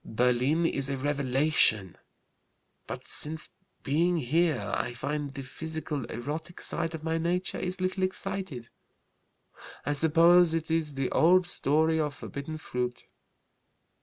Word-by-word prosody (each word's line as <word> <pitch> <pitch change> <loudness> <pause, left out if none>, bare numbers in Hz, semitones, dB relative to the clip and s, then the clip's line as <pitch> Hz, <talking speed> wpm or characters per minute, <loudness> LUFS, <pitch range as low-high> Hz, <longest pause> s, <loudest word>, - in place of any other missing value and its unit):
Berlin 125 +8 +1
is 140 -4 0
a 135 - -2
revelation. 135 - +2 0.9
But - - -6
since 155 +1 -1 0.3
being 170 +5 +2
here 150 -5 +1
I 120 - -2
find 145 +4 -3
the 135 0 -7
physical 155 0 -5
erotic 155 +8 -6
side 165 0 +1
of 155 - -8
my 165 0 -1
nature 180 +3 -1
is 185 +1 -3
little 185 +1 -1
excited. 185 -9 -3 1.2
I 145 - +1
suppose 165 +3 +5
it 160 0 -3
is 160 -3 0
the 135 -1 -1
old 180 +2 +5
story 160 -1 +1
of 150 -2 -1
'forbidden 145 +3 -6
fruit.' 125 -5 -4
155 Hz, 130 wpm, -28 LUFS, 135-165 Hz, 1.2 s, suppose